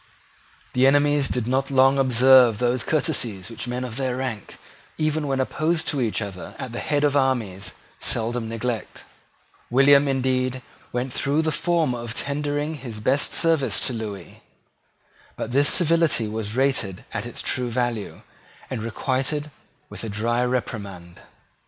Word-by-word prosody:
The 130 +1 +4
enemies 145 0 +3
did 125 -3 -1
not 130 +3 0
long 135 0 +4
observe 130 -2 +6
those 120 +1 +1
courtesies 120 - -1
which 115 +2 -6
men 125 +1 -3
of 120 -2 -6
their 130 -2 -1
rank, 130 -6 -5 0.4
even 155 -1 0
when 135 -1 0
opposed 155 +5 0
to 140 -4 0
each 115 -2 0
other 95 -3 -8
at 130 - -6
the 120 - -5
head 145 -1 0
of 145 -1 +2
armies, 120 -9 0 0.3
seldom 115 0 -1
neglect. 115 0 -4 0.7
William, 140 +3 +5
indeed, 130 -1 0 0.3
went 125 +1 -3
through 145 +3 +1
the 160 - 0
form 165 -4 +1
of 120 -1 -5
tendering 145 +2 -2
his 120 -7 -7
best 130 +7 +2
services 150 -10 +2
to 130 - -1
Lewis. 105 -4 -6 1.0
But - - -5
this 140 +3 +3
civility 165 -8 +3
was 110 0 -4
rated 130 -8 0
at - - -3
its - - -6
true 125 -2 -1
value, 120 -3 -3 0.5
and 125 -4 -3
requited 135 +6 -2 0.4
with - - -7
a 115 - -4
dry 115 +4 0
reprimand. 100 -8 -4
130 Hz, 150 wpm, -23 LUFS, 115-140 Hz, 1.0 s, observe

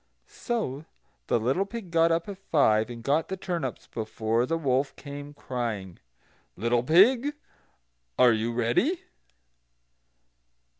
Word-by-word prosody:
So 160 - -4 0.4
the - - +2
little 130 - +1
pig 200 -3 -8
got 165 0 +4
up 165 0 0
at 200 -2 -7
five, 115 - +2
and 115 -1 -8
got 145 +5 +1
the 190 - -4
turnips 170 -9 -4
before 110 +2 -1
the 165 - 0
wolf 135 -2 0
came 145 0 -8
crying: 115 -10 -4 0.6
"Little 115 +4 +1
pig, 230 - +5 0.8
are 125 -2 +6
you 110 +1 -1
ready?" 120 - +1
140 Hz, 120 wpm, -27 LUFS, 120-175 Hz, 0.8 s, are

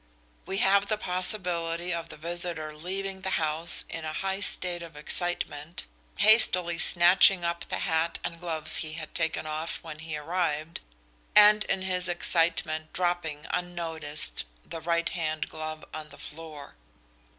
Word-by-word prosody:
We 190 - -3
have 200 +1 +3
the 215 - 0
possibility 180 -3 +1
of 165 -1 -5
the - - -9
visitor 165 -1 -5
leaving 190 +4 -5
the 190 - -3
house 160 +2 +3
in 165 - -7
a 155 0 -5
high 195 +3 -3
state 180 -3 0
of 165 -2 -10
excitement, 155 0 -1 0.3
hastily 180 -6 +5
snatching 175 +1 +6
up 170 0 -2
the - - -3
hat 165 -1 0
and 170 - -5
gloves 165 -3 +2
he 155 -2 -4
had 160 -1 -8
taken 160 -1 -2
off 155 +2 -4
when 155 -2 -9
he 155 -1 -5
arrived, 155 0 -3 0.6
and 210 0 +7
in 190 -1 -2
his 185 -1 0
excitement 165 -3 0
dropping 175 -4 -2
unnoticed 160 - -3 0.2
the 165 - -8
right 170 +1 0
hand 155 -3 -3
glove 155 0 -7
on 155 -1 -7
the - - -14
floor." 155 -2 -10
170 Hz, 150 wpm, -27 LUFS, 155-180 Hz, 0.6 s, and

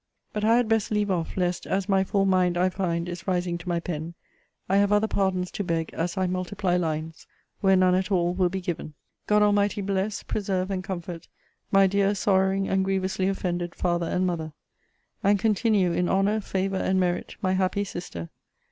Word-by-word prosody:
But 210 - -2
I 225 +2 +5
had 245 -2 +2
best 225 -1 +1
leave 210 -2 0
off, 170 -1 -2
lest, 180 -1 -1
as 195 0 -1
my 195 -2 +3
full 195 0 +1
mind, 185 -2 +2
I 180 +1 +3
find, 175 -2 -2
is 175 +2 -7
rising 175 -2 0
to 175 - -7
my 170 -1 +1
pen, 165 0 -5 0.5
I 195 - +2
have 200 0 +3
other 210 +1 +3
pardons 190 -3 0
to 205 - -3
beg 165 -3 -2
as 170 +3 -2
I 190 - +2
multiply 185 0 -1
lines, 160 -2 -3 0.3
where 195 -2 +4
none 185 -1 +4
at 185 +2 0
all 175 -2 +2
will 180 -1 +2
be 190 +1 -4
given. 170 -4 -5 0.3
God 210 0 +4
Almighty 205 0 +2
bless, 195 +1 -2
preserve, 190 -2 -2
and 185 -1 -2
comfort 175 -2 -6 0.4
my 195 0 +6
dear 200 +1 +2
sorrowing 195 0 +2
and 190 0 +1
grievously 190 0 0
offended 175 -3 -2
father 175 -1 0
and 185 +2 0
mother! 160 -3 -3 0.7
and 200 +1 +4
continue 210 -3 +2
in 175 +1 0
honour, 200 +3 +2
favour, 195 0 -2
and 190 0 +1
merit, 180 -1 -1
my 185 0 +2
happy 190 +2 +1
sister! 175 - -7
185 Hz, 190 wpm, -26 LUFS, 175-195 Hz, 0.7 s, my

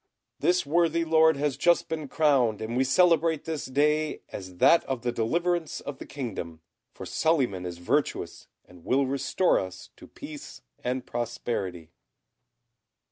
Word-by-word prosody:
This 180 -2 +2
worthy 165 +2 +2
Lord 160 -1 +4
has 145 -1 0
just 175 0 +3
been 155 -2 -4
crowned, 135 -8 +2
and 110 +2 -4
we 130 - +3
celebrate 165 +1 +3
this 160 -2 -3
day 150 +3 +1
as 95 -2 -8
that 170 - +5
of 130 -3 -4
the 120 - 0
deliverance 170 +9 -1
of 145 -1 -7
the - - -9
kingdom; 95 - -6 0.3
for - - -9
Suliman 125 - 0
is 85 -1 -6
virtuous, 130 +12 -2 0.2
and 90 -2 -17
will 135 +2 +2
restore 135 +7 +1
to - - -2
us 95 0 -13 0.2
peace - - -9 0.2
and 125 +1 -2
prosperity." 100 -8 -4
140 Hz, 145 wpm, -27 LUFS, 115-160 Hz, 0.3 s, that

